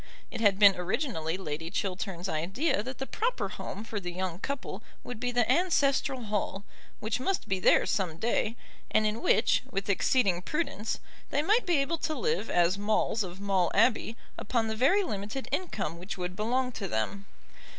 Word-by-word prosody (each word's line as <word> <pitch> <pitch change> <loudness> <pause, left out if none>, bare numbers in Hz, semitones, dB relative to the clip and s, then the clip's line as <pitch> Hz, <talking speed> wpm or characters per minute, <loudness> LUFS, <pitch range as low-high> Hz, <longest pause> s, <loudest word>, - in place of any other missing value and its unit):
It 235 - -5
had 200 -3 +4
been 200 -2 +8
originally 180 - -1
Lady 160 -3 -4
Chiltern's 190 -1 -3
idea 195 - 0
that 255 +4 -6
the 270 - -3
proper 475 - -1
home 210 - -6
for 220 -2 -4
the 175 -2 -5
young 180 -1 -3
couple 280 +5 -4 0.2
would 245 -3 -7
be 245 +1 -1
the 240 -1 +2
ancestral 280 -7 +2
hall, 205 -2 -2 0.4
which 220 +3 -1
must 380 +9 -1
be 190 -1 0
theirs - - +4
some 180 -6 -1
day, 225 +2 0 0.3
and 215 - +3
in 215 +2 -1
which, 220 - +3
with 200 -3 -1
exceeding 195 -3 +2
prudence, 230 - -2 0.3
they 290 +2 +1
might 425 +6 +3
be 345 -3 +4
able 290 +4 0
to 310 - -1
live 465 - 0
as 175 +3 +3
Maules 215 +2 +1
of 185 -1 -5
Maule 195 -3 +2
Abbey 230 -1 +3 0.2
upon 230 +1 0
the 220 - -2
very 305 - +4
limited 215 - -4
income 210 - -2
which 185 +4 -6
would 180 0 -4
belong 250 +5 0
to 200 -5 -4
them. 190 - -2
215 Hz, 180 wpm, -29 LUFS, 190-260 Hz, 0.4 s, been